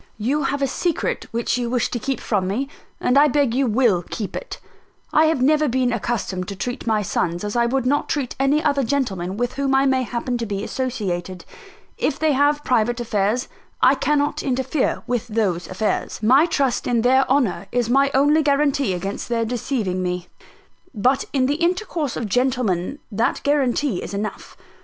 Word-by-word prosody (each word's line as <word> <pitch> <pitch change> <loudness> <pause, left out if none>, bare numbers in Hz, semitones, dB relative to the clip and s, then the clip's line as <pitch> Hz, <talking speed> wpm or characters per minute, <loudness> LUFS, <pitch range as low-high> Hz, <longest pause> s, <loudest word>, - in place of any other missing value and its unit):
You 270 +7 0
have 280 0 -1
a - - +2
secret 335 +5 -2
which 235 +1 -1
you 240 -1 -2
wish 245 -1 0
to 240 - -2
keep 270 +3 -2
from 195 -4 -1
me; 240 +9 -1 0.3
and 255 +3 +3
I 295 - +6
beg 280 -4 +1
you 265 +1 +1
will 220 -6 +2
keep 210 -4 -5
it. - - -6 0.5
I 310 - +5
have 315 -5 +1
never 305 +2 +3
been 250 -1 +1
accustomed 200 -5 -2
to 200 - -5
treat 245 +5 -5
my 215 -2 +2
sons 175 -1 -1
as 210 +2 -3
I 235 0 +3
would 260 +1 0
not 285 +3 +1
treat 275 -5 -2
any 280 +3 +2
other 285 -2 +2
gentlemen 205 -9 -1
with 245 +2 -1
whom 275 -1 0
I 270 +1 +4
may 265 -1 +2
happen 245 0 -3
to 230 - -2
be 200 0 -3
associated. 190 -9 -3 0.5
If - - 0
they 315 -1 +2
have 290 +1 +2
private 240 0 +1
affairs, 220 +1 0 0.3
I 255 - +6
cannot 290 +2 0
interfere 265 +1 -1
with 245 0 -2
those 205 -6 -1
affairs. 205 +3 -2
My 265 +9 +5
trust 275 -6 0
in 235 -2 +1
their 260 +2 +5
honour 250 -8 +1
is 245 -2 0
my 275 +3 +3
only 290 +3 +4
guarantee 280 -7 +1
against 195 +6 -5
their 230 -1 0
deceiving 220 -5 -2
me; 180 -1 -3 0.7
but 255 +6 +2
in 265 -2 +2
the 285 +3 0
intercourse 345 - -1
of 235 - -2
gentlemen 245 -2 0
that 225 +3 +1
is - - -9
guarantee 280 -5 +1
enough. 205 +1 -5
250 Hz, 185 wpm, -22 LUFS, 215-275 Hz, 0.7 s, I